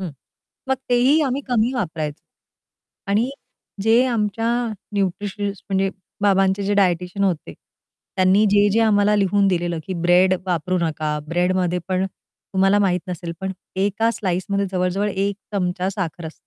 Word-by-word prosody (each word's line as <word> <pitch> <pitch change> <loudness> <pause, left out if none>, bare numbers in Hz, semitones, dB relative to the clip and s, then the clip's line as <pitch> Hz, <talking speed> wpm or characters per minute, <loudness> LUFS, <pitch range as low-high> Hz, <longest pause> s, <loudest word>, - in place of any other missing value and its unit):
हं. 185 -3 -4 0.6
मग 265 - +2
तेही 255 +6 +4
आम्ही 275 -1 0
कमी 240 +1 +2
वापरायचं. 160 - -3 0.9
आणि 220 +6 +2 0.5
जे 225 +4 +4
आमच्या 225 -1 0 0.5
न्यूट्रिशनिस्ट 200 +1 -2
म्हणजे 195 0 +1 0.3
बाबांचे 195 0 +3
जे 205 +1 0
डायटीशियन 180 0 +1
होते, 180 -5 -1 0.6
त्यांनी 190 +3 +4
जे-जे 205 +2 +4
आम्हाला 210 -2 +3
लिहून 200 0 +2
दिलेलं 175 -2 0
की 190 - -3
ब्रेड 180 +2 +5
वापरू 180 +1 0
नका, 155 -2 -1
ब्रेडमध्ये 180 0 +1
पण 185 0 +1
तुम्हाला 195 +1 -1
माहीत 185 -3 +2
नसेल 175 -1 -5
पण 190 0 -3 0.2
एका 205 +4 +1
स्लाइसमध्ये 200 0 -1
जवळ-जवळ 185 +2 0
एक 195 +1 -1 0.2
चमचा 180 -1 -1
साखर 175 -4 -4
असते. 160 - -8
195 Hz, 135 wpm, -21 LUFS, 180-205 Hz, 0.9 s, ब्रेड